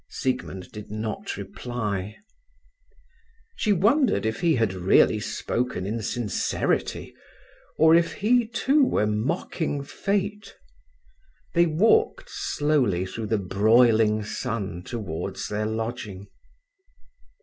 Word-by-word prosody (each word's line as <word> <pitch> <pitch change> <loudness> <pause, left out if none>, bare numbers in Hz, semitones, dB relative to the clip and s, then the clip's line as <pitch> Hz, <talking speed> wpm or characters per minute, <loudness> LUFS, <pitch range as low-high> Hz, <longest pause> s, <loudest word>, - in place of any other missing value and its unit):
Siegmund 125 -8 -3
did 105 -1 -9
not 110 +1 -4
reply. 105 -5 -4 1.4
She 215 - 0
wondered 210 - +3
if 110 0 -1
he 165 -3 +3
had 115 -5 +1
really 95 +3 +4
spoken 105 0 -2
in 110 +3 -3
sincerity, 110 0 -2 0.6
or 160 +1 +6
if 170 0 +3
he, 235 +3 +2
too, 270 +6 +2
were 105 - +2
mocking 140 - -2
fate. 200 +6 -3 1.0
They 170 0 +4
walked 440 - +2
slowly 130 -12 0
through 110 +3 -5
the 110 - +1
broiling 110 +2 +3
sun 105 -5 -4
towards 95 -6 -5
their 105 +1 -1
lodging. 110 -3 -4
115 Hz, 105 wpm, -25 LUFS, 105-165 Hz, 1.4 s, or